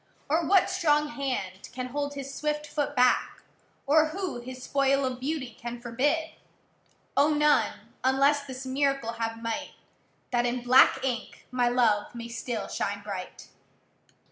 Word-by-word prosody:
Or 320 0 +2
what 385 +1 +5
strong 300 -5 +2
hand 255 -10 -4
can 255 0 -4
hold 285 +2 -3
his 275 0 -6
swift 300 0 -2
foot 295 -1 -2
back? 250 0 +2 0.4
Or 310 +2 +5
who 365 -4 -4
his 255 +1 -9
spoil 275 0 +2
of 255 -1 -3
beauty 260 -4 -3
can 240 0 -6
forbid? 285 +7 0 0.8
O! 290 +2 +5
none, 300 0 +2
unless 275 +2 +3
this 260 0 -7
miracle 275 -2 0
have 225 0 -3
might, 230 +6 -3 0.6
That 240 -1 +2
in 240 0 -2
black 255 +2 +6
ink 245 -4 -4
my 245 -1 +2
love 235 -3 +2
may 235 0 -6
still 230 -1 -4
shine 205 0 -3
bright. 195 -3 -7
260 Hz, 145 wpm, -28 LUFS, 240-295 Hz, 0.8 s, black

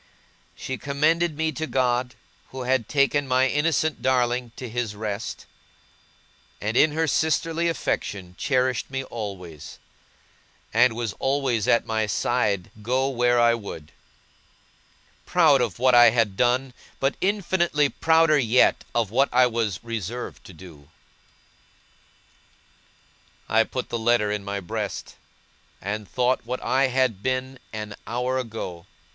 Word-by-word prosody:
She 130 -1 -5
commended 155 +3 +1
me 160 0 0
to 155 +2 -4
God, 125 -2 0 0.3
who 130 -1 -6
had 130 -2 0
taken 145 0 +2
my 130 +1 +3
innocent 155 +1 0
darling 125 -1 +1
to 125 - -7
His 115 -2 -3
rest; 105 0 -5 1.1
and 110 +2 -3
in 150 +3 +4
her 160 +1 +1
sisterly 160 +2 +1
affection 95 - -3
cherished 130 0 0
me 135 0 -3
always, 95 - -8 1.0
and 120 +1 +4
was 115 -3 -3
always 135 -5 0
at 115 - +3
my 110 -1 -1
side 105 -5 0
go 130 +4 0
where 120 -2 +2
I 120 0 +5
would; 100 -9 -7 1.4
proud 155 -7 +4
of 115 -7 -2
what 130 +1 +3
I 120 -1 +8
had 110 -4 +1
done, 125 +3 +1 0.3
but 135 +1 +1
infinitely 180 -6 +1
prouder 160 0 +3
yet 125 0 +3
of 115 -4 0
what 135 +4 +3
I 125 +1 +5
was 115 -5 -2
reserved 115 +1 -5
to 95 - -12
do. 80 -4 -14 2.6
I 110 +1 +4
put 130 - -5
the 115 - -2
letter 110 -2 +2
in 105 -1 -3
my 100 0 -4
breast, 85 - -5 0.7
and 100 +1 -5
thought 125 +1 +1
what 125 +2 -4
had 130 0 +2
I - - -14
been 130 +5 -3
an 105 -1 -6
hour 125 +2 -1
ago! 105 -7 -6
125 Hz, 135 wpm, -24 LUFS, 110-135 Hz, 2.6 s, I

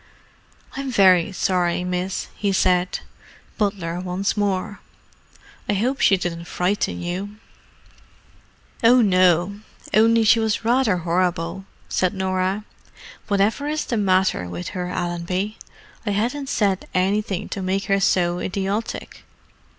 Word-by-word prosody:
"I'm 275 0 -4
very 190 -5 +5
sorry, 180 -2 0
miss," 180 +1 -2
he 200 -1 -1
said—butler 180 0 -2
once 185 +2 -2
more. 205 -1 -1 0.9
"I - - +3
hope 250 +7 0
she 195 - +5
didn't 170 -1 -4
frighten 180 +1 -1
you." 190 +4 -4 1.5
"Oh, 245 +2 +6
no—only 200 +4 +2
she 220 +1 +5
was 220 0 -1
rather 235 -5 +3
horrible," 175 +1 -1 0.2
said 185 +1 0
Norah. 190 +2 -1 0.6
"Whatever 210 +8 +1
is 305 +1 -1
the 240 - -2
matter 185 - +1
with 90 0 -5
her, 180 -1 -4
Allenby? 180 +4 -3 0.4
I 220 - -3
hadn't 245 +7 -1
said 195 -3 0
anything 195 +1 0
to 195 - -4
make 190 +1 -1
her 195 0 +2
so 175 -2 +2
idiotic." 195 +4 -3
190 Hz, 115 wpm, -22 LUFS, 180-210 Hz, 1.5 s, Oh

